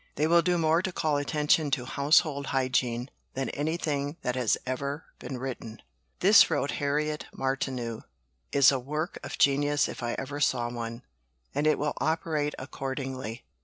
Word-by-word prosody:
"They 150 - +1
will 170 +2 +5
do 175 +1 +1
more 165 +1 +3
to 185 - -2
call 155 -4 0
attention 150 +1 +2
to 130 -2 0
Household 140 +1 +2
Hygiene 130 -1 0 0.2
than 135 0 -1
anything 145 -1 -2
that 125 - -1
has 125 -4 +2
ever 140 +4 -3
been 130 - -6
written." 120 -3 -6 0.4
"This," 200 +4 +7
wrote 140 - 0
Harriet 150 +2 -1
Martineau, 130 -4 -2 0.5
"is 140 -1 +6
a 135 - 0
work 150 +6 -3
of - - -6
genius 145 +1 +3
if - - -7
ever 130 +4 -3
I - - -5
saw 120 -4 +1
one; 115 0 -5 0.5
and 145 +2 +1
it 155 - +4
will 150 0 -1
operate 155 -2 0
accordingly. 130 -3 -5
140 Hz, 160 wpm, -28 LUFS, 130-150 Hz, 0.5 s, This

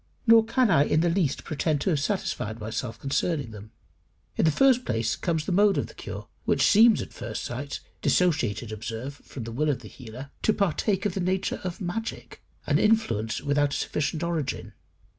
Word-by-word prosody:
Nor 230 -1 +7
can 235 -1 +2
I 145 -3 +5
in 155 - +2
the 170 0 +2
least 165 -6 0
pretend 155 -1 -1
to 190 - +1
have 150 - +1
satisfied 125 - -2
myself 115 +1 -4
concerning 140 -1 -1
them. 105 0 -10 0.7
In - - +2
the 160 - +5
first 255 - +4
place 115 - 0
comes 160 -3 -1
the - - -2
mode 200 +2 +4
of - - 0
the - - -13
cure, - - -8 0.2
which - - +2
seems 225 +1 +6
at - - -12
first 110 - -5
sight 140 +4 -5 0.2
(dissociated, 125 - +1
observe, 115 +6 -5
from 130 - -9
the 115 - -6
will 150 +6 0
of 130 -4 -1
the 110 - -10
healer) 125 +4 -10
to 215 - +3
partake 200 +1 0
of 205 - 0
the 195 - -3
nature 185 +1 -1
of 180 -1 -4
magic 210 +6 -5 0.2
an - - +2
influence 115 - +1
without 145 0 +1
a - - 0
sufficient 155 +2 -2
origin. 165 -6 -3
150 Hz, 195 wpm, -26 LUFS, 120-190 Hz, 0.7 s, Nor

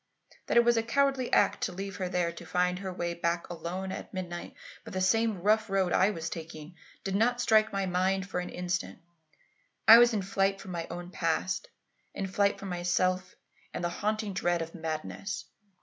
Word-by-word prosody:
"That - - +2
it 235 - +6
was 240 -1 +4
a - - +4
cowardly 270 +2 +1
act - - +3
to - - -3
leave 195 +1 -6
her 185 -2 -2
there 180 -2 0
to 170 - -10
find 180 0 0
her 190 -1 -4
way 175 -1 -3
back 170 0 -1
alone 180 +3 -4
at - - -7
midnight 175 -2 -6 0.3
by - - -9
the 190 - -3
same 205 0 +2
rough 215 +1 +3
road 190 -2 +1
I 190 - +4
was 165 -6 -4
taking, 160 0 -7 0.3
did 195 0 -2
not 240 +4 +2
strike 220 -2 +4
my 195 -1 -1
mind 190 +1 0
for 185 - -2
an 180 - -4
instant. 180 -1 -3 0.9
I 225 +1 +11
was 240 0 +6
in 210 -4 -1
flight 195 +1 +1
from 190 - -8
my 170 -2 -4
own 175 +1 -7
past; - - -1 0.5
in 195 - -2
flight 200 +1 +1
from 195 - -7
myself 180 +1 0 0.4
and - - -3
the 175 - +1
haunting 210 +3 -2
dread 175 -2 0
of 165 - -10
madness. 165 +5 -4
185 Hz, 195 wpm, -29 LUFS, 175-205 Hz, 0.9 s, I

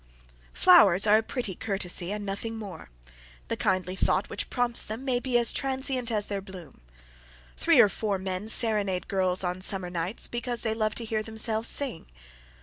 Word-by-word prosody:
Flowers 175 - +6
are 215 +1 +5
a - - -1
pretty 225 -3 -3
courtesy 190 -2 -2
and 210 0 -4
nothing 205 +3 -4
more. 205 - -9 0.6
The - - -1
kindly 185 -1 -1
thought - - 0
which - - -4
prompts 245 -2 +1
them 225 +5 -6
may 250 -2 0
be 250 -1 0
as 235 -1 +2
transient 265 -2 -1
as 210 -3 0
their 200 -1 -4
bloom. 180 - -12 0.7
Three - - +3
or - - +8
four 205 0 -2
men 190 +2 -5
serenade 210 -6 +4
girls 185 -1 0
on 180 +1 -3
summer 190 -2 -1
nights 175 +5 -3
because 240 0 -4
they 220 -2 0
love 215 -1 -1
to 235 - -4
hear 220 -1 -2
themselves 220 0 -2
sing. 265 - -1
210 Hz, 175 wpm, -27 LUFS, 190-230 Hz, 0.7 s, or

